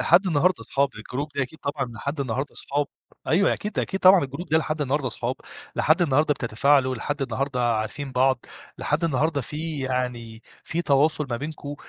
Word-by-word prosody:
لحد 180 +4 +5
النهارده 175 +2 +2
أصحاب، 140 0 +1
الجروب 130 +7 -4
دي 140 - +1
أكيد 150 +4 -7
طبعًا، 140 -2 -2
لحد 140 +6 -4
النهارده 135 +2 -2
أصحاب. 145 +1 -2 0.4
أيوه، 185 +5 +3
أكيد، 210 0 -5
أكيد 190 - -1
طبعًا، 185 -4 +7
الجروب 140 +6 -6
ده 160 +1 +4
لحد 155 -1 -2
النهارده 140 0 0
أصحاب، 120 +1 -2 0.4
لحد 160 +3 +3
النهارده 150 0 +3
بتتفاعلوا، 130 +3 +2
لحد 140 +4 -3
النهارده 135 -1 -2 0.2
عارفين 130 +6 -4
بعض، 130 -1 +2 0.3
لحد 155 +3 0
النهارده 150 0 +1
في 150 +2 -4
يعني 125 -3 -3 0.2
في 170 +1 -2
تواصل 150 +1 +2
ما 120 - 0
بينكم. 145 +1 -6
140 Hz, 170 wpm, -25 LUFS, 130-155 Hz, 0.4 s, طبعًا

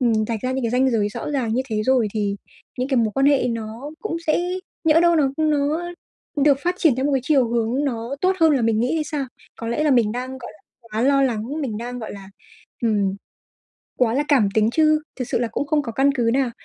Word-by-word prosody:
ừm, 240 -3 +2 0.2
rạch 225 -3 -2
ra 255 +1 -1
những 260 -2 -2
cái 225 - 0
ranh 260 +1 +2
giới 210 -3 +1
rõ 210 - -5
ràng 240 -6 -1
như 260 - +1
thế 215 0 0
rồi, 255 -5 +3
thì 205 -1 -1 0.4
những 255 +2 -1
cái 265 - +1
mối 225 -2 +3
quan 270 +1 +3
hệ 280 -3 +3
nó 230 +5 -5
cũng 380 -6 -3
sẽ 310 - +2 0.4
nhỡ 320 +1 +5
đâu 340 -1 +4
nó 275 -3 +2
nó 310 +3 0 0.4
được 280 -1 +4
phát 355 +1 +1
triển 315 -8 +4
theo 260 - -1
một 290 - 0
cái 265 - +2
chiều 265 -6 +3
hướng 235 +4 0
nó 240 +1 -3
tốt 375 +1 +2
hơn 320 -2 +5
là 260 -4 +1
mình 225 -1 +2
nghĩ 250 +6 0
hay 310 -1 0
sao? 290 -2 -3 0.3
Có 230 - -5
lẽ 265 +6 0
là 300 - +3
mình 230 -4 +3
đang, 255 +2 -5
gọi - - -9
là, 205 - -23 0.3
quá 220 +2 -2
lo 275 +1 +4
lắng, 250 +4 -1
mình 225 -6 -3
đang, 245 +1 -5
gọi 220 - -6
là, 195 -1 -10 0.5
ừm, 205 -4 +1 0.8
quá 235 -2 +2
là 285 +3 +1
cảm 240 -9 +4
tính, 220 0 +3
chứ 310 0 +3
thực 255 - -4
sự - - 0
là 240 - 0
cũng 285 - -2
không 300 -1 +2
có 235 -4 -5
căn 275 +4 +3
cứ 235 -2 +1
nào, 260 -3 +1
255 Hz, 250 wpm, -22 LUFS, 230-290 Hz, 0.8 s, nhỡ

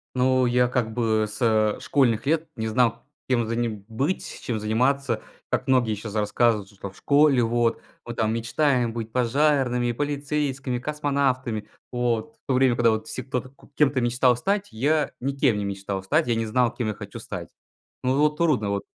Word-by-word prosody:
Ну, 130 0 +3
я, 125 0 +3
как 120 -3 -1
бы, 110 -2 +1
со 110 -1 +1
школьных 125 -4 +1
лет 160 +1 +1
не 110 0 -3
знал 115 0 +1 0.2
кем 120 -3 +1
же 115 +1 -2
мне 120 0 0 0.2
быть, 140 +11 -3
чем 115 -3 -2
заниматься, 120 +2 0 0.3
как - - -1
многие 125 -4 +3
сейчас 105 0 -7
рассказывают, 105 -1 +1
что 100 0 -8
в 95 - -21
школе, 140 -3 +4
вот, 115 0 +1 0.2
мы 120 - -5
там 110 -1 0
мечтаем 120 +1 +1
быть 115 -1 -5
пожарными, 125 -1 +2
полицейскими, 140 -2 -2
космонавтами. 135 -6 -1 0.2
Вот, 120 +3 -1
в - - -42
то 135 - 0
время, 130 -1 +4
когда 115 -2 +3
все, 130 - -6
кто 125 -2 -2 0.3
кем-то 140 -3 +3
мечтал 125 +1 +3
стать, 195 - -1
я 145 +7 +1
никем 135 -4 +1
не 100 - -2
мечтал 100 -1 -4
стать, 155 - +1
я 120 - +1
не 115 0 -1
знал 120 +2 +2
кем 120 -4 -3
я 105 - -2
хочу - - -9
стать. - - -7 0.5
Ну, 130 +1 +1
вот, 150 +1 +2
трудно, 130 -12 +2
вот 100 0 -2
120 Hz, 175 wpm, -24 LUFS, 110-140 Hz, 0.5 s, школе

